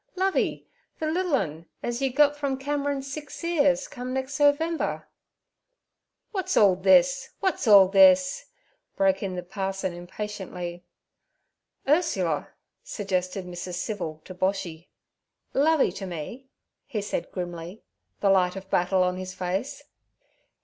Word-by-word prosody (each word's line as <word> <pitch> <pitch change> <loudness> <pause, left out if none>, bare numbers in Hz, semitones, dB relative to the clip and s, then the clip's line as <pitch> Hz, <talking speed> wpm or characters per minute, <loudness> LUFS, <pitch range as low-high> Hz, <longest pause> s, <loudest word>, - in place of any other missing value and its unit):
'Lovey, 380 +1 0 0.3
ther 310 0 -1
liddle 355 -2 +1
un 165 - -3 0.2
az 240 +1 -2
you 270 -1 +1
gut 290 +2 +4
from 280 -2 -2
Cameron's 280 0 -2
six 300 +2 -8
'ears 285 -5 +2
come 250 +1 -6
nex' 265 +1 -3
November.' 305 +3 +1 1.2
'What's 375 -3 -1
all 200 -3 +6
this? 190 +9 +4
What's 380 - -1
all 200 -3 +9
this?' 280 - +5 0.5
broke 195 0 +2
in 190 -2 -3
the 180 - -4
parson 190 0 -3
impatiently. 180 -1 -6 1.0
'Ursula' 200 - +1 0.3
suggested 185 -2 -2
Mrs. 180 0 -6
Civil 175 -5 -4
to 185 - -8
Boshy. 185 -3 -2 0.7
'Lovey 305 +1 +3
t' 195 - -6
me' 180 - -7 0.4
he 235 -7 -3
said 205 - -4
grimly, 175 +2 -6 0.4
the 200 - +4
light 180 -1 +3
of 195 0 -9
battle 185 +1 +3
on 180 0 0
his 185 0 -6
face. 185 +7 -3
200 Hz, 130 wpm, -26 LUFS, 180-280 Hz, 1.2 s, all